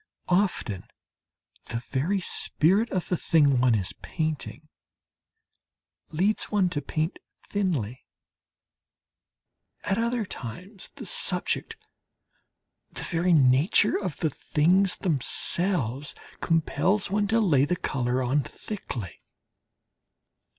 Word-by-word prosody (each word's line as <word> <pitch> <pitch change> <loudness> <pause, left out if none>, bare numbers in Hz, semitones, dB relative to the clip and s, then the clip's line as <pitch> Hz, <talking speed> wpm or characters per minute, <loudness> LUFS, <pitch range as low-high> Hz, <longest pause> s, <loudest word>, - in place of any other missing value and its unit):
Often 180 - 0 0.8
the 115 - -4
very 160 +10 0
spirit 190 +7 +2
of 185 -2 -2
the 180 - +1
thing 145 -6 +3
one 125 -2 +4
is 100 -2 -2
painting 155 -2 -4 1.4
leads 190 +7 0
one 200 -4 +1
to 145 - -2
paint 155 +4 -3 0.3
thinly; 145 - -2 1.8
at 200 +2 0
other 235 -1 0
times 185 - -7
the - - -8
subject, 455 - 0 1.1
the - - -6
very 175 +1 0
nature 145 +7 +4
of 185 -6 -3
the 160 - -1
things 180 +8 +2
themselves, 150 - +1 0.2
compels 180 +5 +1
one 205 0 +1
to 225 +3 +2
lay 150 -11 +3
the 180 - 0
colour 130 -5 -1
on 135 +4 +1
thickly. 125 - -7
165 Hz, 100 wpm, -26 LUFS, 135-195 Hz, 1.8 s, one